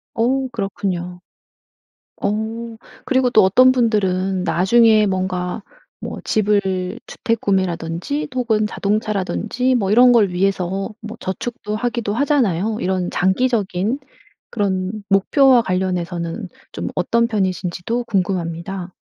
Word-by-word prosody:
어 260 +3 +1
그렇군요. 185 -4 -3 1.0
어 225 +2 -3 0.3
그리고 260 -1 +2
또 220 -4 +5
어떤 255 +7 +6
분들은 195 -6 +1
나중에 215 +4 +4
뭔가 185 0 -2 0.4
뭐 - - -6
집을 200 -1 0
주택 230 -3 -2
구매라든지 185 - -1
혹은 220 -4 +1
자동차라든지 215 +4 -1
뭐 195 -5 0
이런 245 +3 +7
걸 220 -5 +4
위해서 190 +2 -1
뭐 220 +2 -8
저축도 210 +2 -4
하기도 235 -2 -2
하잖아요. 225 - +1
이런 185 -1 -1
장기적인 205 +2 0 0.5
그런 200 -1 -2
목표와 250 +6 +5
관련해서는 180 0 -2 0.2
좀 - - -5
어떤 235 0 +1
편이신지도 190 +2 -2
궁금합니다. 180 -2 -2
205 Hz, 265 characters per minute, -20 LUFS, 185-235 Hz, 1.0 s, 이런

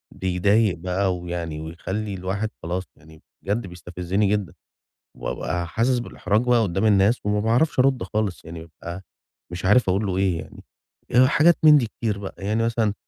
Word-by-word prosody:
بيضايق 95 +3 +2
بقى 90 +2 -1
ويعني 85 -3 -5
ويخلّي 95 +6 -5
الواحد 95 +4 -3
خلاص 90 +3 -2
يعني 80 0 -17 0.2
بجد 100 +1 -2
بيستفزِّني 90 +3 -2
جدًا 100 -4 -1 0.7
وأبقى 85 +1 -3
حاسس 120 +7 +1
بالاحراج 105 -3 -1
بقى 120 -2 +3
قُدّام 95 +1 -1
الناس 105 +2 +4
وما 105 0 +1
باعرفش 120 +8 +1
أرُد 130 -1 +3
خالص، 95 -2 -2
يعني 80 0 -8
بابقى 85 +3 -9 0.5
مش 90 +1 -6
عارف 105 +4 +4
أقول 100 +3 +1
له 95 - -1
إيه 95 -3 +1
يعني، - - -12 0.5
آآ 125 +2 +6
حاجات 160 +4 +5
من 150 -1 +9
دي 120 - 0
كتير 110 -2 -3
بقى. 100 - -7
يعني 105 +3 -1
مثلًا 115 -3 0
100 Hz, 165 wpm, -23 LUFS, 90-110 Hz, 0.7 s, من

